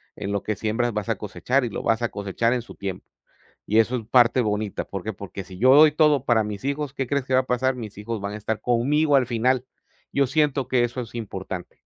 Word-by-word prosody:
"En 100 0 -4
lo 100 - -2
que 110 - -2
siembras, 110 +3 -1
vas 105 -2 -3
a - - 0
cosechar, 130 +1 -1
y 120 - -3
lo - - -5
vas 115 0 +1
a 120 - +1
cosechar 105 +4 -1
en 125 - -1
su - - -13
tiempo". 95 -2 -6 0.6
Y 110 +2 +3
eso, 120 +3 +2
es 115 - -4
parte 125 0 +4
bonita, 105 -2 -2
¿por 95 -2 -6
qué? 110 - -3
Porque 100 0 -8
si 90 0 -12
yo 130 +5 +6
doy 150 +1 +8
todo 150 -3 +3
para 115 -4 +3
mis 105 -1 -6
hijos 140 0 -2
¿Qué 135 - -2
crees 140 -1 -1
que 130 - -3
va 130 - +5
a - - -12
pasar? 130 +1 +1
Mis 110 -5 -8
hijos 105 0 -5
van 100 +1 -4
a - - -5
estar 110 +1 -3
conmigo 140 +5 +2
al 135 -2 +4
final. 125 +2 +1 0.5
Yo 140 -1 +2
siento 145 -1 +1
que 125 -2 +2
eso 120 +1 -2
es 120 -1 -10
importante, 95 -5 -6
120 Hz, 250 wpm, -24 LUFS, 105-130 Hz, 0.6 s, doy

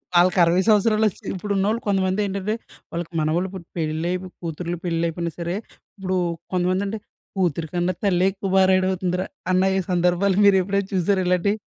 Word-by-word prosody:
వాళ్ళకి 180 +1 +5
60 170 +2 +3
సంవత్సరాలు 215 0 +4
వచ్చి - - -16
ఇప్పుడు 200 +2 -5
ఉన్నోళ్ళు 215 +4 +1
కొంతమంది 190 0 +1
ఏంటంటే, 200 +1 -2 0.4
వాళ్ళకి 170 0 -4
మనవళ్ళు 165 +5 0
పుట్టి, 180 -3 -9
పెళ్లై 160 +2 -1 0.3
కూతుర్లు 170 +1 -4
పెళ్ళిళ్ళు 170 -1 0
అయిపోయినా 170 0 -3
సరే 170 +1 -2 0.4
ఇప్పుడు 185 -1 -1 0.4
కొంతమంది 185 +2 +1
అంటే 215 +2 -4 0.4
కూతురి 170 -3 0
కన్నా 175 +1 0
తల్లే 185 -2 +3
ఎక్కువ 195 0 -5
బా 190 - +6
రెడీ 185 0 +3
అవుతుందిరా 180 0 -1 0.2
అన్న 185 0 +3
ఈ - - +2
సందర్భాలు 180 +2 +2
మీరు 200 - +6
ఎప్పుడైనా 200 +1 -1
చూసారా 190 +1 +2
ఇలాంటివి? 180 +3 +2
185 Hz, 170 wpm, -23 LUFS, 175-195 Hz, 0.4 s, బా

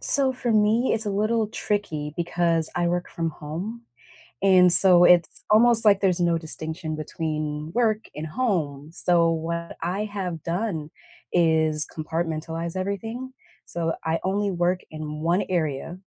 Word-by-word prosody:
So 270 -2 +2
for 245 -2 -2
me, 215 +4 +3
it's 220 -1 -3
a - - 0
little 215 +2 +1
tricky 160 -10 -3
because 170 -1 0
I 175 -1 +1
work 175 +1 -1
from 165 -1 -2
home 175 +11 -6 0.6
and, 185 -2 +6
so 180 -2 +6
it's 175 -1 +4
almost 230 +1 +5
like 200 -2 +5
there's 185 -3 +2
no 170 -1 +2
distinction 160 0 -5
between 155 0 -4
work 220 -3 +1
and 150 +1 -5
home, 155 - -2
so 170 -1 +3
what 170 +1 -3
I 185 +5 -1
have 190 -6 -4
done 170 -4 -3 0.4
is 160 -3 +2
compartmentalize 165 +1 -3
everything, 225 +7 -4 0.3
so 165 -1 -2
I 160 +1 0
only 200 +2 0
work 180 0 0
in 150 -1 -6
1 175 +4 +2
area, 165 -1 -2
175 Hz, 145 wpm, -24 LUFS, 160-205 Hz, 0.6 s, and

